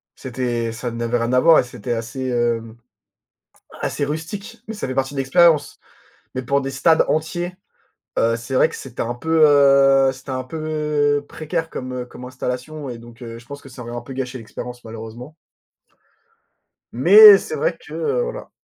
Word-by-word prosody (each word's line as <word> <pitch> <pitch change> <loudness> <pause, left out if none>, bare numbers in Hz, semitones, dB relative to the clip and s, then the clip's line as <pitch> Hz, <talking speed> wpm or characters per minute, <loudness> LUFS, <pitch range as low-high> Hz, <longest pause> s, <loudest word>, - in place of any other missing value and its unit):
c'était 120 -3 -3
ça 120 +1 -5
n'avait 120 +1 -1
rien 115 +1 -1
à 125 - +5
voir 165 +3 +6
et - - +4
c'était 120 -1 -5
assez, 120 +3 -4
hem, 120 -2 -1 1.1
assez - - -2
rustique, 195 +11 -6
mais 220 - -5
ça 210 - -4
fait 130 - -4
partie 135 +1 -1
de - - -5
l'expérience. 145 +2 +3 0.5
Mais 130 - -3
pour 140 +3 +1
des 135 - -4
stades 150 +5 +3
entiers, 175 +3 -2 0.6
heu, 115 0 +2
c'est 120 +3 -8
vrai - - +4
que - - -8
c'était 135 - -7
un 120 +1 -2
peu, 160 +5 0
heu, 135 -2 +5
c'était 130 +2 -14
un 130 0 -3
peu 150 -1 -1
précaire 165 +1 -4
comme, 130 0 -6
heu, 125 -1 -4
comme 125 - -12
installation 130 +3 -5
et 120 - -6
donc, 115 0 -15
heu, 115 -1 -8
je 115 - -15
pense 140 +3 -9
que - - -14
ça 130 -1 -11
aurait 120 0 -7
un 120 - -4
peu 135 - -9
gâché 130 -1 -4
l'expérience, 120 +1 -9
malheureusement 115 +6 -9 1.6
Mais 200 - +9
c'est 455 - -5
vrai - - -1
que, - - -14
heu, 470 +2 -1
voilà. 485 +1 -6
130 Hz, 185 wpm, -21 LUFS, 120-155 Hz, 1.6 s, Mais